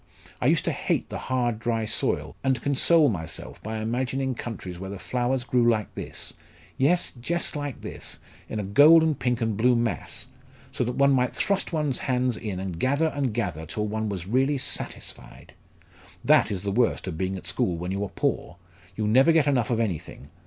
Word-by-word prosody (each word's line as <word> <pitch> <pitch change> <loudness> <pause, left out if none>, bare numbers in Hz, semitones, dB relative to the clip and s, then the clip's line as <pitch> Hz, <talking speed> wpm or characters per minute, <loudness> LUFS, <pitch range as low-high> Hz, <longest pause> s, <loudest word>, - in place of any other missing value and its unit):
I - - +2
used - - +3
to - - +1
hate - - -1
the - - -5
hard 120 -3 -1
dry 115 -1 -1
soil, - - -1
and 130 -1 +2
console 150 +3 +4
myself 85 - -4
by 110 +1 -4
imagining 130 +4 -1
countries 95 -7 -6
where 95 +1 -6
the 100 - -6
flowers 125 +4 -1
grew 125 -2 +3
like 110 -3 0
this - - -6 0.4
yes, 170 +7 +2
just 165 +9 -2
like 145 -3 -4
this, - - -6 0.3
in 110 - -3
a - - -2
gold 145 +12 +7
and 155 -4 +1
pink 125 -1 0
and 110 -2 0
blue 125 +4 +3
mass, 115 -2 -2 0.5
so - - -1
that 125 +1 -3
one 140 0 +4
might 125 -2 +2
thrust 200 -1 0
one's 150 -5 0
hands 125 -2 0
in 105 -5 -4
and 95 -3 -5
gather 140 - +2
and 140 -5 -1
gather 85 -9 -2
till 105 +6 -2
one 110 +1 -2
was 95 -4 -4
really 135 +7 +2
satisfied! 135 - -4 0.7
That - - +5
is 95 -2 -3
the 100 - -1
worst 115 -1 +1
of 90 - -3
being 95 +3 -2
at 90 - -10
school 85 0 -1
when 90 +2 -4
you 100 +1 -1
are 100 - -4
poor! 90 - -2 0.4
You 105 0 -1
never 130 +9 +5
get 160 -2 +4
enough 130 -4 +2
of 115 -2 +1
anything. 85 -8 -4
120 Hz, 195 wpm, -26 LUFS, 100-135 Hz, 0.7 s, gold